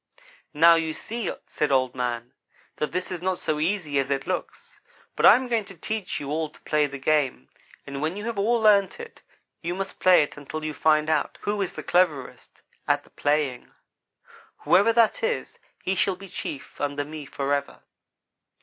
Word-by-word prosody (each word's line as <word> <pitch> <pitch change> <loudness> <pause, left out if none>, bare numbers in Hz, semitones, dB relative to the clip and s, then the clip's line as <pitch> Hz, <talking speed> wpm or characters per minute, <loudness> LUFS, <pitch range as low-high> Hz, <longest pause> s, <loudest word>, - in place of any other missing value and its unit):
"'Now, 165 +2 +7
you 165 -1 0
see,' 225 +8 -4
said 150 - -1
Old 130 -2 +2
man, 120 -1 -3 0.4
'that 150 - -2
this 180 +1 -3
is 180 -2 -4
not 185 0 0
so 155 -3 -1
easy 160 -4 0
as 135 0 -1
it 135 -1 -1
looks, 185 - -5 0.4
but - - +5
I - - +10
am 255 0 -1
going 230 -3 +1
to 195 -2 -12
teach 215 +5 -3
you 145 0 -5
all 155 0 -1
to - - -20
play 150 -1 +1
the 140 0 -7
game; 135 - 0 0.4
and 140 0 -6
when 160 +5 -1
you 205 - -5
have 230 -3 -3
all 230 +4 +2
learned 205 -3 +4
it, 465 -1 -10 0.4
you 175 +1 -3
must 195 0 -5
play 185 -4 +6
it 145 - -7
until 155 +2 -6
you 155 - -3
find 155 0 +3
out 155 -2 0
who 205 0 -1
is 190 - -2
the - - -7
cleverest 160 -7 0 0.2
at - - +2
the - - -23
playing. 145 -4 -1 0.9
Whoever 205 +5 +5
that 230 -1 +3
is, 475 +1 -2 0.2
he 190 - 0
shall 195 0 +1
be 195 +2 -11
chief 145 -4 -7
under 145 0 -1
me, 150 -1 -8
forever.' 140 +1 -2
155 Hz, 190 wpm, -25 LUFS, 145-195 Hz, 0.9 s, I